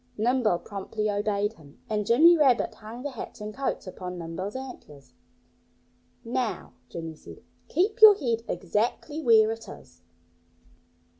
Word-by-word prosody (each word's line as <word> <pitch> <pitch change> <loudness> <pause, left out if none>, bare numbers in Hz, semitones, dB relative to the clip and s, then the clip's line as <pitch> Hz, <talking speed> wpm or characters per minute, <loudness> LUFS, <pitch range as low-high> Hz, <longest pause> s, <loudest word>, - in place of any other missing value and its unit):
Nimble 230 -4 +2
promptly 210 +3 -4
obeyed 205 +1 -1
him. 150 -8 -18
And 210 -2 -2
Jimmy 320 +9 +7
Rabbit 270 -7 +3
hung 225 +3 -10
the 285 - -4
hats 240 -1 -8
and 210 0 -6
coats 270 +2 -3
upon 180 -1 -7
Nimble's 175 +5 -5
antlers. 150 - -10 1.1
"Now," 235 -1 -3 0.2
Jimmy 165 -1 -6
said, 155 - -14 0.2
"keep 415 +8 0
your 430 -2 +11
head 235 - -1
exactly 235 - -2
where 220 -5 +5
it 225 0 -7
is!" 85 0 -13
220 Hz, 135 wpm, -27 LUFS, 195-255 Hz, 1.1 s, your